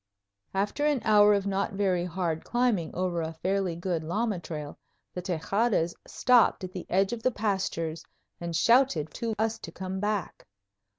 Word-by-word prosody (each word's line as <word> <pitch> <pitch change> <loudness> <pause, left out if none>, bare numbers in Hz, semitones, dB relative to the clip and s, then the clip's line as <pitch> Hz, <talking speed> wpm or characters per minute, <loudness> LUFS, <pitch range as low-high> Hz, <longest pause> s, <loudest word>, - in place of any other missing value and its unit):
After 205 +9 0
an 295 -3 +2
hour 210 -1 +6
of 200 -1 -1
not 200 0 -1
very 190 -3 +1
hard 170 -2 -2
climbing 240 -9 +1
over 180 -2 -1
a 160 0 -4
fairly 185 0 -1
good 170 -1 -2
llama 205 +4 -1
trail, 150 -3 -7 0.3
the 180 - -4
Tejadas 180 +1 0
stopped 245 -5 +3
at 185 - -5
the 185 -1 -7
edge 195 +3 +2
of 235 - -5
the 255 - +3
pastures 190 -8 -2 0.4
and 170 -1 -4
shouted 230 - +3
to 230 -2 -3
us 220 +1 0
to 165 - -8
come 190 +2 -5
back. 205 - -3
190 Hz, 165 wpm, -28 LUFS, 170-215 Hz, 0.4 s, hour